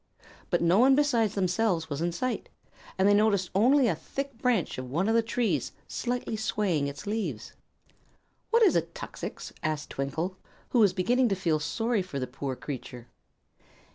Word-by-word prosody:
But 175 -2 +1
no 170 +4 +4
one 265 +2 +6
besides 240 -8 +2
themselves 185 -3 +1
was 145 -1 -4
in 175 +1 0
sight, 250 +9 -3 0.5
and 190 +1 +4
they - - +6
only 205 +1 +5 0.2
noticed 185 -1 -5
a 240 +2 +4
thick 275 - -5
branch 240 - 0
of 130 -1 -6
one 170 +9 0
of 225 - +2
the 230 - +5
trees 230 +1 -1
slightly 245 -2 -3
swaying 205 -9 0
its 140 +7 -7
leaves. 215 +1 -3 1.0
"What 465 0 +4
is 405 - +5
a - - +4
tuxix?" - - -8
asked 155 -2 -2
Twinkle, 160 +7 -3 0.3
who 245 - +2
was 205 -4 +5
beginning 245 +6 +2
to 195 - +1
feel 170 -5 0
sorry 225 +7 0
for 180 -6 -6
the 130 - -1
poor 135 +1 -5
creature. 125 -3 -7
195 Hz, 170 wpm, -28 LUFS, 160-235 Hz, 1.0 s, one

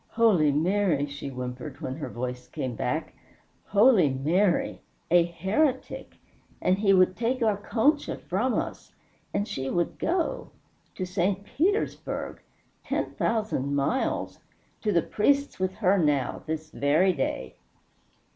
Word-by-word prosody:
"Holy 200 -10 +4
Mary!" 165 -1 +2
she 140 0 -7
whimpered, 125 +2 -6
when 130 -5 -4
her - - -5
voice 125 +1 -5
came 130 -2 -4
back. - - -2 0.5
"Holy 205 - +5
Mary! 170 +8 +1 0.3
A 175 -1 +6
heretic! 195 - -1 0.4
And 185 +1 +2
he 200 -1 +3
would 185 -1 +5
take 240 +2 0
our 215 -2 +3
Concha 240 +9 +1
from 230 +8 -1
us! - - -4 0.4
And 200 +1 -1
she 135 - -3
would 175 -1 -1
go! 365 +8 -1 0.5
To 185 - -3
St. 185 +2 0
Petersburg! 370 - -1 0.4
Ten - - -2
thousand 210 - -1
miles! 140 - -1 0.4
To 215 - +1
the 170 -4 +3
priests 280 +5 +1
with 185 0 0
her 200 -2 +3
now 145 -5 +1
this 155 0 -4
very 160 +7 +3
day!" 65 - -3
185 Hz, 130 wpm, -27 LUFS, 145-215 Hz, 0.5 s, A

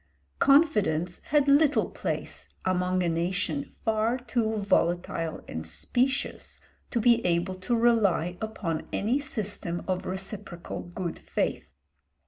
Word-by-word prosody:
Confidence 210 - +3
had 290 -1 +3
little 290 +1 +4
place - - -4 0.2
among 185 0 +1
a - - +1
nation 180 - -1
far 225 -1 0
too 235 -3 -1
volatile 175 -5 0
and 80 0 -5
specious 260 +2 -1 0.3
to 235 - 0
be 235 0 +4
able 175 +1 +1
to 215 +6 0
rely 205 -7 +3
upon 185 -7 -3
any 235 +7 +1
system 205 -10 -3
of 185 -1 -1
reciprocal 190 -1 -5
good 175 -1 -5
faith. - - -3
200 Hz, 115 wpm, -28 LUFS, 175-240 Hz, 0.3 s, little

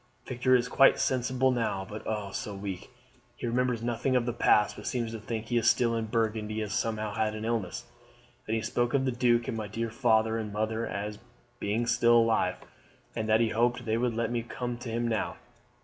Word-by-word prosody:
Victor 130 +1 +2
is 125 0 +2
quite 135 +2 +5
sensible 130 0 +1
now, 115 -6 -1
but 105 +2 -7
oh, 105 -3 -3
so 100 +1 -4
weak! 95 -2 -6 0.5
He - - -5
remembers 120 -1 0
nothing 120 +2 0
of 125 -2 +2
the 120 - -1
past, 105 -3 +3
but - - -8
seems 120 -3 -2
to 115 - -5
think 110 +1 -4
he 120 +1 0
is 115 - +4
still 115 -2 +2
in 115 -1 -1
Burgundy, 110 -1 -1
and 105 -2 -3
has - - -2
somehow 110 -1 -1
had 110 0 0
an 110 0 -5
illness. 115 -6 -2 0.6
Then 110 - 0
he 110 - -1
spoke 120 +3 0
of 135 -1 +2
the 130 - +1
duke 120 -1 +2
and - - -2
my 110 -2 -4
dear 115 +2 -3
father 110 -2 +2
and 105 -2 -4
mother 110 +2 -1
as 105 +1 -4 0.4
being 110 +4 0
still 120 0 +4
alive, 115 -5 +2 0.6
and 110 0 -2
that 110 +1 +4
he 115 - +2
hoped 120 +2 +1
they 110 0 0
would 120 -2 0
let 115 0 -1
me 120 -1 0
come 120 +1 -5
to 120 - -6
him 120 +1 -1
now. 110 -4 -1
115 Hz, 220 wpm, -29 LUFS, 110-120 Hz, 0.6 s, quite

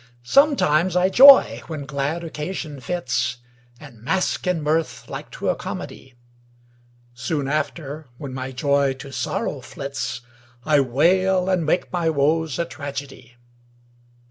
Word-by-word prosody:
Sometimes 185 - +3
I 180 +1 +3
joy 270 +6 +8
when 155 -4 -6
glad 145 +4 -3
occasion 155 -2 -5
fits, 125 -6 -2 0.4
And 120 -7 -14
mask 185 +8 -1
in 175 -4 0
mirth 155 +2 -1
like - - -7
to - - -3
a - - +1
comedy: 130 -2 -8 1.0
Soon 135 +4 -3
after 150 0 -3
when 140 -2 -7
my 130 0 -5
joy 140 +1 +1
to 135 +1 -10
sorrow - - -3
flits, 140 -3 -5 0.4
I 150 -2 +4
wail 180 +8 +2
and 180 -3 +1
make 175 - 0
my 170 -2 +1
woes 155 0 +1
a 170 - 0
tragedy. 140 -5 -8
150 Hz, 130 wpm, -22 LUFS, 135-170 Hz, 1.0 s, joy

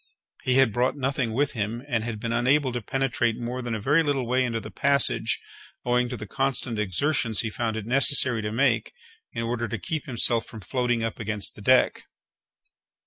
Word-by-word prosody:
He 125 - +1
had 130 -5 +4
brought 125 +5 +1
nothing 135 -3 -1
with 140 +5 +1
him, 115 +1 -3
and 120 -5 0
had 115 -2 -4
been 115 +1 -3
unable 130 +2 +2
to 120 - -3
penetrate 120 -1 0
more 125 +2 -4
than 120 -2 -3
a - - -3
very 150 +10 +3
little 140 -5 0
way 125 +2 +1
into 115 -2 -1
the 110 -1 -9
passage, 140 +7 +2 0.5
owing 125 0 +2
to 125 - -5
the 105 - -7
constant 130 -1 -2
exertions 115 - 0
he 110 - -3
found 110 0 -2
it 110 - -5
necessary 130 -1 +3
to 105 0 -3
make 115 -1 +1 0.4
in 115 - -3
order 115 0 -2
to - - -3
keep 155 -2 -4
himself 120 -2 +2
from 110 - -10
floating 120 +1 -1
up 115 - -3
against 105 -2 -3
the - - -13
deck. 130 +4 +3
120 Hz, 195 wpm, -25 LUFS, 115-130 Hz, 0.5 s, had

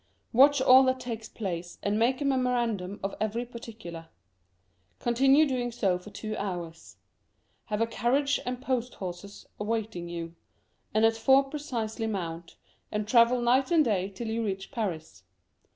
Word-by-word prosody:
Watch 280 +4 +6
all 260 +1 +8
that 260 0 +1
takes 225 -3 -6
place, 175 -5 -5
and 205 +1 0
make 255 +4 +2
a - - 0
memorandum 240 -7 0
of 195 - -2
every 225 +3 -1
particular. 220 -9 -9 0.9
Continue 270 +5 +4
doing 250 -3 -1
so 195 -6 0
for 180 - -12
two 215 +1 -5
hours; 175 -4 -6 0.7
have 210 +1 -2
a - - +4
carriage 250 +6 +1
and 250 0 -3
post 250 -2 -2
horses 185 +2 -8
awaiting 210 -5 -3
you; 170 -1 -5 0.6
and 215 +1 +3
at 225 0 +3
four 265 +4 +5
precisely 240 -6 -4
mount, 170 -5 -5 0.4
and 210 -1 -2
travel 240 +2 +5
night 255 +3 +3
and 325 -4 +4
day 195 -4 0
till 210 +4 -7
you 225 +1 -1
reach 195 -2 -4
Paris. 170 - -4
225 Hz, 150 wpm, -28 LUFS, 195-250 Hz, 0.9 s, all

